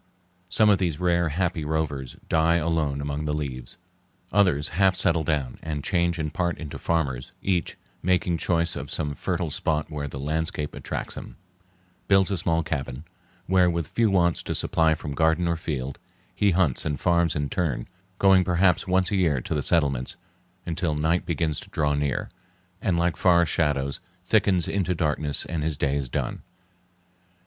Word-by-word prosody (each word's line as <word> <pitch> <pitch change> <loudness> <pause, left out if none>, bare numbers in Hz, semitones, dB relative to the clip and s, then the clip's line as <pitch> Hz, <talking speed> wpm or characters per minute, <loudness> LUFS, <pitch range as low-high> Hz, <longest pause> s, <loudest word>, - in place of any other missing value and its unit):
Some 105 +3 +4
of 100 - +3
these 85 -6 -1
rare, 85 -2 +2
happy 85 0 -1
rovers 75 -4 -2
die 80 +1 +3
alone 80 -4 0
among 70 +1 -3
the 75 - -1
leaves. 65 -5 -4 0.5
Others 90 -8 +3
half 95 +3 +3
settle 85 -3 +2
down 75 -6 -1
and 75 -3 -4
change 85 -2 +1
in 75 -2 -2
part 85 +1 -1
into 75 -2 -7
farmers; 70 -7 -1
each, 90 -3 0 0.2
making 90 -1 +1
choice 85 -1 +1
of 70 -1 -6
some 75 -2 -2
fertile 85 +1 -2
spot 75 +2 -1
where 75 -1 -3
the 70 0 -7
landscape 75 +1 -2
attracts - - -5
him, - - -9 0.7
builds 95 -1 +4
a 95 - 0
small 85 -1 +1
cabin, 70 -3 -4 0.4
where, 90 -1 +4
with 85 -2 -1
few 115 +5 +2
wants 85 -3 +2
to - - -3
supply 80 -1 +2
from 75 - -6
garden 80 +4 +2
or 85 - +1
field, 70 -5 -4 0.3
he 105 - +2
hunts 85 -8 +2
and 75 -3 -2
farms 85 -3 +2
in 75 -1 -1
turn, 70 -8 -1 0.3
going 95 -1 +5
perhaps 90 0 +2
once 95 +1 +2
a - - +1
year 80 -8 +2
to 60 - -4
the 75 - 0
settlements, 70 -5 +1 0.5
until 85 -2 -1
night 80 +4 0
begins 80 -2 -1
to - - -12
draw 75 -1 +1
near, 70 -2 -1 0.5
and, 90 -3 +1
like 85 0 +1
forest 85 -3 +4
shadows, 70 -3 0 0.3
thickens 95 -3 +3
into 90 -3 0
darkness 75 -2 +1
and 80 -2 -3
his 75 -2 -1
day 70 -1 +1
is 70 -3 -2
done. - - -3
80 Hz, 175 wpm, -25 LUFS, 75-90 Hz, 0.7 s, going